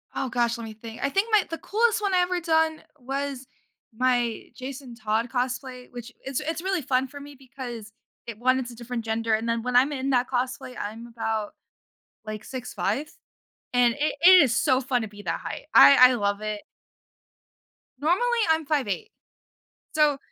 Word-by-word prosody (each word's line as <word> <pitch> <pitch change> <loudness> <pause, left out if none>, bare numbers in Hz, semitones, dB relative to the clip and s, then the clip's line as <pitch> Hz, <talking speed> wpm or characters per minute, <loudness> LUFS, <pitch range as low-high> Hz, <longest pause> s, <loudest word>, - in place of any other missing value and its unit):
Oh, 265 - -2
gosh, 240 -1 0
let 235 - -7
me 220 - -8
think. 225 +1 -10
I 280 - +2
think 390 +9 0
my 430 -3 +5
the 330 - -4
coolest 450 +3 +1
one 400 -2 0
I 365 - +4
ever 360 0 0
done 320 -1 +1 0.2
was 270 0 -4 0.5
my 245 -1 +1
Jason 260 -1 -8
Todd 225 +1 -1
cosplay, 250 0 -3
which 245 0 -9
it's 270 0 -2
it's 320 +2 -3
really 380 -1 -1
fun 255 0 0
for 285 +2 -10
me 285 0 -11
because 245 -4 -8 0.3
it 230 -2 -8
1, 255 +2 +3
it's 250 -2 -5
a - - -11
different 235 0 -5
gender 225 0 0
and 220 +1 0
then 230 0 0
when 250 0 -2
I'm 260 +4 +5
in 270 -1 -2
that 250 -1 +2
cosplay, 250 0 -3
I'm 225 +3 -6
about 225 -2 -3 0.7
like 215 -1 -6
6'5", 255 +1 -3 0.7
and 245 -1 +4
it 295 +1 0
it 365 +1 +9
is 250 -6 +3
so 260 -1 +3
fun 250 -1 0
to 220 - -4
be 205 0 -12
that - - -2
height, - - -7
I 255 -2 +9
I - - +1
love 205 -3 -1
it. 215 -1 -4 1.4
Normally, 415 - +2
I'm 320 -1 +2
5'8". 295 - -1 0.8
So 300 -2 +4
255 Hz, 185 wpm, -25 LUFS, 230-290 Hz, 1.4 s, it